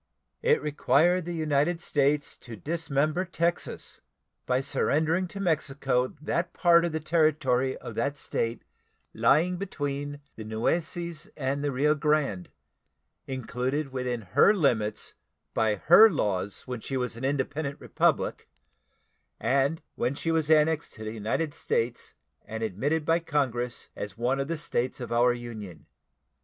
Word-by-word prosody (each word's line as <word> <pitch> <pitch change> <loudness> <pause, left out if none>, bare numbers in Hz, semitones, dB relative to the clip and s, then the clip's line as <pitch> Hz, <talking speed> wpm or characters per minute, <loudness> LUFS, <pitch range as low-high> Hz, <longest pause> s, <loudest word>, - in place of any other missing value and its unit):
It 465 -1 +3
required 160 +4 +2
the 175 0 -4
United 155 +1 +1
States 145 -2 +1
to 120 -2 -10
dismember 155 - -1
Texas 170 -1 -3 0.5
by 125 0 +2
surrendering 160 +5 +1
to 195 - -8
Mexico 140 -7 +1
that 170 +4 -2
part 170 -2 +5
of 170 - -1
the 160 - -2
territory 150 -5 +2
of - - -8
that 140 +1 -1
State 115 -4 -2 0.5
lying 150 +11 +3
between 145 -6 -4 0.2
the 110 - -6
Nueces 165 - -2
and 140 0 -1
the 145 - 0
Rio 145 +3 +3
Grande, 150 - 0 0.8
included 130 +2 -2
within 125 -2 -2
her 105 - +4
limits 115 - 0 0.4
by 110 -2 +2
her 175 - +8
laws 100 - -1
when 125 -2 -4
she 135 +4 -3
was 125 -2 -2
an 115 - -8
independent 140 +1 -1
republic, - - 0 0.9
and 140 +4 +1
when 125 +3 -1
she 165 - -1
was 160 -2 +1
annexed 160 0 +3
to 110 - -9
the 110 - -4
United 115 +8 -2
States 115 -3 -2 0.3
and 110 +1 -5
admitted 140 - -1
by 165 +2 +3
Congress 130 -7 -2
as 105 +1 -6
one 125 +4 0
of 135 - -1
the 165 +1 -2
States 130 -5 -2
of 125 - -6
our 120 +1 +4
Union. 110 -8 -7
140 Hz, 140 wpm, -28 LUFS, 125-160 Hz, 0.9 s, her